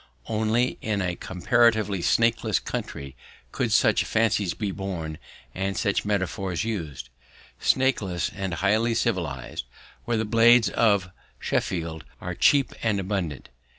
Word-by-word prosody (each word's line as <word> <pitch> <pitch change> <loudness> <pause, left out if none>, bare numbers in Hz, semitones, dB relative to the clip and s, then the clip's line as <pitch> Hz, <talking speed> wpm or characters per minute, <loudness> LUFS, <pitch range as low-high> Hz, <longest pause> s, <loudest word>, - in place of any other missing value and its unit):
Only 110 +3 0
in 105 -2 -1
a 90 -2 -1
comparatively 105 +2 +2
snakeless 115 +7 +2
country 70 -1 -5 0.4
could - - -1
such - - +4
fancies 105 -4 +1
be 105 -3 -2
born 90 -5 -5 0.3
and 95 +1 -2
such 100 -1 0
metaphors 95 -2 -1
used 80 - -4 0.5
snakeless 110 -10 +1
and 95 -4 -3
highly 110 +6 +2
civilized, 85 - -2 0.4
where 120 -1 0
the 110 - 0
blades 115 +1 +5
of 100 -5 +2 0.3
Sheffield 80 -3 -2 0.2
are 90 - -5
cheap 140 - +3
and 105 -3 +1
abundant. 95 -7 -3
100 Hz, 120 wpm, -25 LUFS, 90-115 Hz, 0.5 s, blades